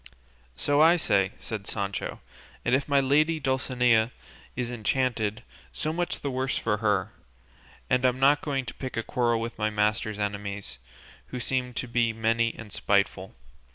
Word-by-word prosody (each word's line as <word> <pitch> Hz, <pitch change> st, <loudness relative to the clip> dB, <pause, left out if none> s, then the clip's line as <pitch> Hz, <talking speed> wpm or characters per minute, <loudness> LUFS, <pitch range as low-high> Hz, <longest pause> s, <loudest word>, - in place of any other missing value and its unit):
"So 145 Hz, -, +2 dB
I 165 Hz, +2 st, +7 dB
say," 100 Hz, -, +1 dB
said 105 Hz, -3 st, -6 dB
Sancho, 100 Hz, -2 st, -3 dB, 0.4 s
"and 120 Hz, -, +2 dB
if 135 Hz, +2 st, +2 dB
my 140 Hz, -1 st, +4 dB
lady 150 Hz, +4 st, +3 dB
Dulcinea 125 Hz, -4 st, +2 dB, 0.5 s
is 125 Hz, -1 st, -2 dB
enchanted, 110 Hz, -2 st, 0 dB, 0.3 s
so 155 Hz, +1 st, -2 dB
much 175 Hz, +1 st, -2 dB
the 140 Hz, -, -2 dB
worse 130 Hz, +1 st, -1 dB
for 105 Hz, -2 st, 0 dB
her, 105 Hz, -1 st, +1 dB, 0.8 s
and 125 Hz, 0 st, +2 dB
I'm 130 Hz, 0 st, +2 dB
not 140 Hz, +2 st, +5 dB
going 135 Hz, -3 st, -2 dB
to 120 Hz, -, -6 dB
pick 130 Hz, -3 st, -6 dB
a 115 Hz, -, 0 dB
quarrel 120 Hz, -1 st, +1 dB
with 115 Hz, 0 st, -5 dB
my 110 Hz, 0 st, +1 dB
master's 105 Hz, 0 st, 0 dB
enemies, 100 Hz, -7 st, -4 dB, 0.5 s
who 125 Hz, -, -5 dB
seem 125 Hz, 0 st, -1 dB
to 125 Hz, -, -3 dB
be 115 Hz, -1 st, +1 dB
many 115 Hz, +1 st, +1 dB
and 105 Hz, -3 st, -9 dB
spiteful. 100 Hz, -1 st, 0 dB
120 Hz, 160 wpm, -27 LUFS, 105-130 Hz, 0.8 s, I